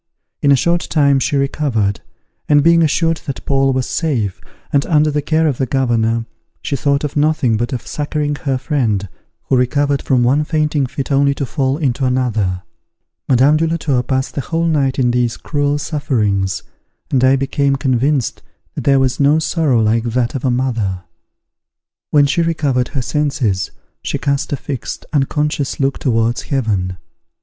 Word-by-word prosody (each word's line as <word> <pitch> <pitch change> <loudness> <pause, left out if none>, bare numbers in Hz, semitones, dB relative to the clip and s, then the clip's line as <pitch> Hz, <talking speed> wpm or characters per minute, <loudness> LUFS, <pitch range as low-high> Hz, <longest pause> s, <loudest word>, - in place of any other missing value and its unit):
In 140 - +4
a - - +7
short 170 +5 0
time 140 -3 +3
she 145 +2 -1
recovered, 135 -8 0 0.5
and 145 -1 +5
being 170 +1 +5
assured 165 +1 +2
that 140 - -5
Paul 135 -1 +2
was 130 -1 0
safe, 120 - -2 0.3
and 140 -1 +3
under 155 -2 +3
the 150 0 0
care 160 +2 +1
of 140 -5 -1
the 130 - 0
governor, 115 -3 0 0.4
she 140 - -1
thought 140 +1 0
of 150 - -3
nothing 150 -5 +2
but 120 +5 -2
of 125 - -4
succouring 150 0 -2
her 135 -3 -1
friend, 120 - -1 0.4
who - - 0
recovered 140 +2 +1
from 125 -2 +2
one 135 +5 +3
fainting 150 -3 0
fit 140 +3 -5
only 140 0 +3
to 140 - -2
fall 135 0 -1
into 135 -4 -1
another. 115 -8 0 0.7
Madame 135 +4 +4
de 165 +1 +1
la 165 +1 -1
Tour 140 -6 0
passed 130 +2 -2
the 140 - -2
whole 165 +3 -1
night 140 -5 +1
in 125 -3 +2
these 120 -1 0
cruel 145 -1 -1
sufferings, 110 - -1 0.5
and 130 -2 +2
I 130 +1 +5
became 135 +1 0
convinced 135 -1 0 0.3
that - - -6
there 140 -1 +4
was 130 -1 0
no 145 +2 +4
sorrow 150 -7 +1
like 115 +2 +1
that 120 0 0
of 135 - -4
a 130 - +2
mother. 115 -8 -1 1.1
When 145 -1 +4
she 140 +5 +1
recovered 145 -7 0
her 130 - 0
senses, 130 -10 -1 0.3
she - - -2
cast 140 0 -1
a 145 - 0
fixed, 135 -3 -6
unconscious 150 0 -1
look 135 0 0
towards 115 -1 0
heaven. 100 -9 -1
135 Hz, 175 wpm, -17 LUFS, 125-145 Hz, 1.1 s, a